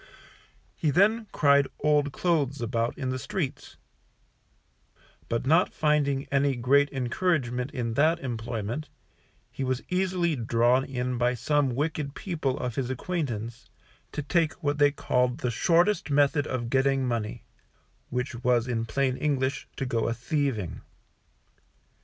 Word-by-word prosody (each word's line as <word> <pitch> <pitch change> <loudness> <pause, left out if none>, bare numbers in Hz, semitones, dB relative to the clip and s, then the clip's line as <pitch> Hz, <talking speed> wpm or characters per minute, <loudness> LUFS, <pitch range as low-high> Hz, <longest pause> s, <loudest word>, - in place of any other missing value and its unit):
He 155 - 0
then 210 +8 +3
cried 140 -1 +4
old 150 -1 +2
clothes 145 -5 0
about 115 0 -1
the 130 -1 -3
streets; 150 -1 -4 1.5
but 115 +2 -1
not 165 +6 +4
finding 145 -3 +1
any 140 0 +2
great 140 +4 +3
encouragement 130 -1 -1
in 115 -3 -3
that 155 +7 +3
employment, 120 +1 -4 0.6
he 135 - -4
was 130 0 -1
easily 180 -3 +1
drawn 120 +2 +2
in 125 -2 -3
by 125 +1 +2
some 135 +1 +1
wicked 145 0 -2
people 155 -8 -2
of 125 -2 -3
his 130 -2 -1
acquaintance, 120 - -4 0.4
to 150 - -4
take 160 -1 +1
what 145 0 -2
they 145 0 +6
called 125 -3 0
the 125 -6 -2
shortest 175 - +2
method 145 +1 +3
of 120 -2 -3
getting 135 -1 +2
money, 115 -3 -3 0.7
which 125 +2 -2
was 125 -1 +2
in 115 -2 -1
plain 130 +1 0
English 135 -2 -1
to 135 - -3
go 115 -3 0
a 115 - -1
thieving. 125 - -2
135 Hz, 135 wpm, -27 LUFS, 125-150 Hz, 1.5 s, they